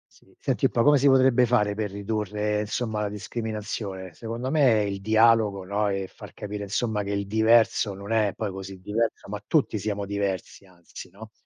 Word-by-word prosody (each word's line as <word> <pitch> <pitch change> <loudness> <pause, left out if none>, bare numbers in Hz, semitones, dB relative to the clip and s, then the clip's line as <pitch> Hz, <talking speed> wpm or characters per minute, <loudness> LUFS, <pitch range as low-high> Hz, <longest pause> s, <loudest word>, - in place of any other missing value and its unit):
Sì, - - -24
senti - - -1
un - - +3
po' 115 - +2
come 145 0 +6
si 140 +1 +3
potrebbe 130 -2 +5
fare 105 -4 +2
per 105 -1 -3
ridurre, 105 +1 -2
insomma, 110 0 -3
la 105 - 0
discriminazione? 105 -3 -5
Secondo 115 - -5
me 125 -9 +4
il 100 -1 -3
dialogo, 110 -2 +3
no, 100 +2 -1
e 95 -1 -2
far - - -12
capire, 105 0 -6
insomma, 110 +1 -1
che 100 - -4
il 100 0 -2
diverso 110 -1 +3
non 100 +2 -8
è 105 -4 +2
poi 105 -3 -3
così 95 0 -8
diverso, 110 +1 -2
ma 105 0 -5
tutti 140 -9 +1
siamo 100 0 -3
diversi 100 -1 -3
anzi, 90 -2 -12
no 110 +3 -12
105 Hz, 190 wpm, -25 LUFS, 100-115 Hz, -, come